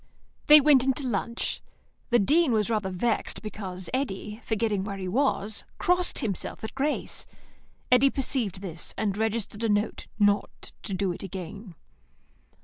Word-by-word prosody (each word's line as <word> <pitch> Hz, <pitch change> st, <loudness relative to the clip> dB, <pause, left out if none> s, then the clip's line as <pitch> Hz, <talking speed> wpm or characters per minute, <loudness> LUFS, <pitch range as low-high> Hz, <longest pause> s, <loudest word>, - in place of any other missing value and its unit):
They 300 Hz, 0 st, +10 dB
went 285 Hz, -3 st, +5 dB
into 265 Hz, +1 st, 0 dB
lunch. 235 Hz, 0 st, -2 dB, 0.5 s
The 240 Hz, -, +5 dB
Dean 290 Hz, -, +3 dB
was 215 Hz, 0 st, +1 dB
rather 210 Hz, -3 st, 0 dB
vexed 215 Hz, +6 st, -1 dB
because 190 Hz, -4 st, -5 dB
Eddy, 215 Hz, -4 st, -3 dB
forgetting 215 Hz, -3 st, 0 dB
where 200 Hz, 0 st, -5 dB
he 185 Hz, -1 st, -5 dB
was, 215 Hz, -2 st, +1 dB
crossed 360 Hz, 0 st, +2 dB
himself 200 Hz, 0 st, -4 dB
at 220 Hz, -, -5 dB
grace. 285 Hz, +3 st, -2 dB, 0.6 s
Eddy 250 Hz, +2 st, +6 dB
perceived 245 Hz, -9 st, 0 dB
this, 170 Hz, -4 st, -5 dB
and 205 Hz, -3 st, 0 dB
registered 220 Hz, 0 st, -2 dB
a 225 Hz, -, +1 dB
note 205 Hz, +1 st, 0 dB
not 205 Hz, -1 st, +1 dB
to 195 Hz, -, -4 dB
do 190 Hz, -1 st, 0 dB
it 175 Hz, -, -7 dB
again. 195 Hz, +1 st, -7 dB
215 Hz, 145 wpm, -27 LUFS, 195-250 Hz, 0.6 s, They